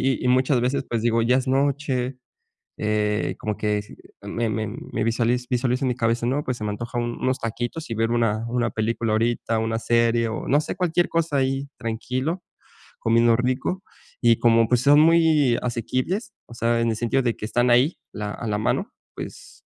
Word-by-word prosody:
y 135 -1 0
y - - +2
muchas 130 0 +3
veces, 135 +2 0
pues 115 -2 -1
digo: 115 -1 +2
"Ya 125 +3 +3
es 130 0 -1
noche", 135 -1 0 0.6
eh, 105 0 0
como 105 -1 -3
que 105 -1 0
si 105 - -14 0.3
me 115 +3 -2
me 110 0 -2
me 110 0 -4
visualiz 120 +2 0
visualiza 125 +1 0
mi 125 -2 +1
cabeza, 115 0 0
¿no?, 140 +4 0
pues 125 -1 -2
se 110 - -6
me 105 - -1
antoja 120 +3 -4
un 120 0 -2
unos 130 0 0
taquitos 120 +6 -4
y - - -1
ver 115 +1 0
una 115 -1 +1
una 120 -1 0
película 110 0 -1
ahorita, 115 0 0
una 115 0 -1
serie 115 0 +2
o 110 - -4
no 145 +2 +4
sé, 155 - -4
cualquier 175 -1 +1
cosa 165 -3 0
ahí 135 +1 0
tranquilo, 130 +9 -3 0.6
comiendo 115 0 +3
rico 130 +10 -1 0.4
y 120 -1 +5
como 115 -1 +4
pues, 125 0 +2
son 145 +2 +6
muy 160 -6 +4
asequibles, 130 - -2
o - - -15
sea, 115 0 +1
en 115 0 +1
el 110 - -1
sentido 120 +3 +1
de 120 -2 0
que 105 - -5
están 120 +2 +1
ahí, 130 +7 +3
la 105 -1 -4
a 115 - -6
la 105 -1 -1
mano, 110 - -1 0.2
pues - - -10
120 Hz, 195 wpm, -23 LUFS, 115-130 Hz, 0.6 s, son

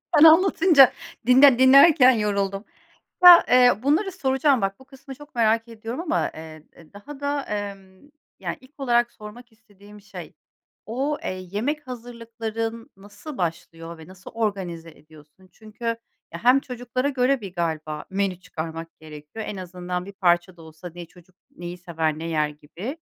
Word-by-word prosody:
Sen 300 - +6
anlatınca 325 -3 +6 0.3
dinle 255 0 +6
dinlerken 270 +1 +7
yoruldum. 200 -3 -2 0.6
Ya, 355 -1 +10
eee, 245 -3 +4
bunları 320 +9 +1
soracağım 270 -5 +1
bak, 195 0 -2
bu 265 - -17
kısmı 270 +1 -12
çok 295 0 -16
merak 225 0 +1
ediyorum 230 +2 -7
ama, 335 -2 -1
eee, 155 -1 -11 0.3
daha 270 +8 -11
da, 285 0 -2
emm, 200 +2 -7 0.3
ya - - -4
ilk 260 +3 -22
olarak 240 -3 +1
sormak 230 +3 -13
istediğim 210 -2 -18
şey 210 +1 -11 0.5
o, 270 +6 -2
eee, - - -3 0.2
yemek 285 +8 -3
hazırlıkların 230 -2 -6
nasıl 205 +9 -11
başlıyor 165 -1 -5
ve 160 - -14
nasıl 185 0 -13
organize 190 -7 -4
ediyorsun? 155 +4 -20
Çünkü, 220 +2 -13 0.5
ya, 170 - -8
hem 250 +3 +5
çocuklara 250 +1 -4
göre 260 -1 0
bir 195 -3 -8
galiba 155 -3 -4
menü 190 -2 -2
çıkarmak 165 -2 -8
gerekiyor. 155 +7 -10
En 205 - -6
azından 180 0 -6
bir 200 - -9
parça 175 -1 0
da - - -14
olsa 160 +2 -11
ne 175 -1 -8
çocuk 175 +2 -22 0.2
neyi 175 0 -7
sever, 160 -3 -3
ne 165 - -6
yer 155 -2 0
gibi. 165 - -9
210 Hz, 155 wpm, -23 LUFS, 175-260 Hz, 0.6 s, Ya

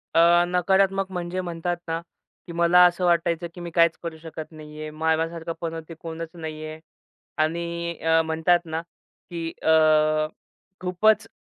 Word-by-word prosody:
अ, 170 +1 +6
नकारात्मक 190 +2 +2
म्हणजे 180 0 -3
म्हणतात 175 0 -3
ना, 165 0 -1 0.5
की 170 - -7
मला 170 +1 +6
असं 180 +1 +2
वाटायचं, 170 0 +1
की 175 - -10
मी 170 -1 -6
काहीचं 170 0 +4
करू 165 -1 -5
शकत 160 0 -8
नाही 155 -1 -11
आहे 155 - -5
माझ्यासारखं 160 +1 -1
पनौती 165 -1 -4
ते - - -6
कोणचं 165 0 -7
नाही 155 -1 -6
आहे 155 0 -7 0.6
आणि 170 +1 -3
अ, 160 0 +4
म्हणतात 160 +2 +3
ना 160 0 -3 0.5
की 165 -1 -3
अ, 155 -1 +4 0.5
खूपचं 215 +5 +2
165 Hz, 150 wpm, -24 LUFS, 160-175 Hz, 0.6 s, अ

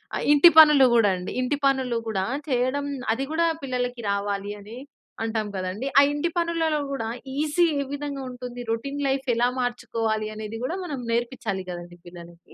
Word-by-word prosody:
ఆహ్, - - -2
ఇంటి 295 +4 +8
పనులు 300 -4 +8
కూడా 220 -4 +4
అండి. 180 - -6
ఇంటి 285 +3 -1
పనులు 260 -3 +1
కూడా, 190 -3 -1 0.2
చేయడం 260 +3 0 0.3
అది 265 +4 -3
కూడా, 335 +1 +2 0.2
పిల్లలకి 250 -2 -3
రావాలి 200 0 -2
అని, 215 +4 -10 0.5
అంటాం 220 -1 -2
కదండీ! 190 +6 -3
ఆ - - +9
ఇంటి 295 +4 -1
పనులలో 330 -2 +1
కూడా, 265 -5 -3 0.3
ఈజీ 305 +3 +2 0.2
ఏ - - 0
విధంగా 285 -1 -4
ఉంటుంది? 245 -1 -8
రొటీన్ 275 +5 -3
లైఫ్ 270 0 -1
ఎలా 240 +1 +3
మార్చుకోవాలి? 225 -3 -2
అనేది 215 +1 -6
కూడా, 330 - -2
మనం 295 -7 -5
నేర్పించాలి, 235 -5 -2
గదండీ! 175 0 -9
పిల్లలకి. 170 -1 -13
245 Hz, 165 wpm, -25 LUFS, 215-280 Hz, 0.5 s, ఆ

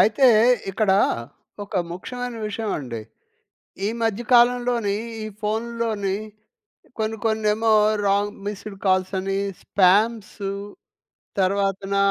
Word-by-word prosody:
అయితే 255 +5 +5 0.4
ఇక్కడా 195 -1 +2 0.7
ఒక 200 - -5 0.2
ముఖ్యమైన 245 +6 -5
విషయం 215 0 -3
అండి. 120 -5 -6 0.9
ఈ - - +1
మధ్య 225 +1 0
కాలంలోనే 240 -3 +3 0.3
ఈ - - -4 0.2
ఫోనుల్లోని 220 -2 -1 0.8
కొన్ని 220 0 -1
కొన్నేమో 220 0 +2 0.4
రాంగ్ 205 +1 +1
మిస్డ్ 205 0 -6
కాల్సని, 190 +1 +1 0.2
స్పామ్సు, 200 +1 +2 0.9
తర్వాతన 195 +1 0
210 Hz, 90 wpm, -23 LUFS, 195-225 Hz, 0.9 s, అయితే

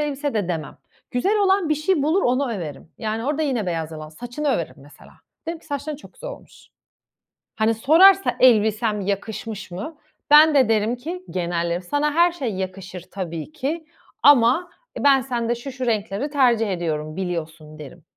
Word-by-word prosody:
elbise." 290 -2 -2
de 205 -5 -1
demem. 160 -4 -4 0.3
Güzel 390 - +1
olan 385 -3 +2
bir 310 - +3
şey 305 +1 0
bulur 320 +7 +2
onu 255 0 +1
överim. 160 -7 -7
Yani 220 +1 -3
orada 295 +2 -1
yine 255 -9 -1
beyaz 165 -3 -3
yalan 155 -1 -8
saçını 245 - -5
överim 195 - -1
mesela. 145 +2 -17 0.3
Derim 330 0 -4
ki: - - -22
"Saçların 290 0 -4
çok 300 - -15
güzel - - -8
olmuş." - - -14 0.9
Hani, 220 +1 +2
sorarsa, 340 - +5
"Elbisem 220 -3 +3
yakışmış 205 +1 -4
mı?" 210 - -7 0.3
Ben 305 +1 +8
de 260 -5 +4
derim 220 +2 +1
ki 335 +9 -7
genellerim, 170 -1 -2
"Sana 290 +9 0
her 345 +1 +5
şey 260 - -4
yakışır 185 -1 -6
tabii 170 - -5
ki 315 +2 -4 0.4
ama, 285 +5 +5 0.3
e, - - -5
ben 275 -2 +5
sende 240 -2 -2
şu 240 +4 -7
şu 260 0 -5
renkleri 220 +3 -1
tercih 245 -6 +2
ediyorum, 155 -4 -3
biliyorsun." 160 -4 -5
derim. 155 +3 -11
235 Hz, 170 wpm, -22 LUFS, 185-295 Hz, 0.9 s, Ben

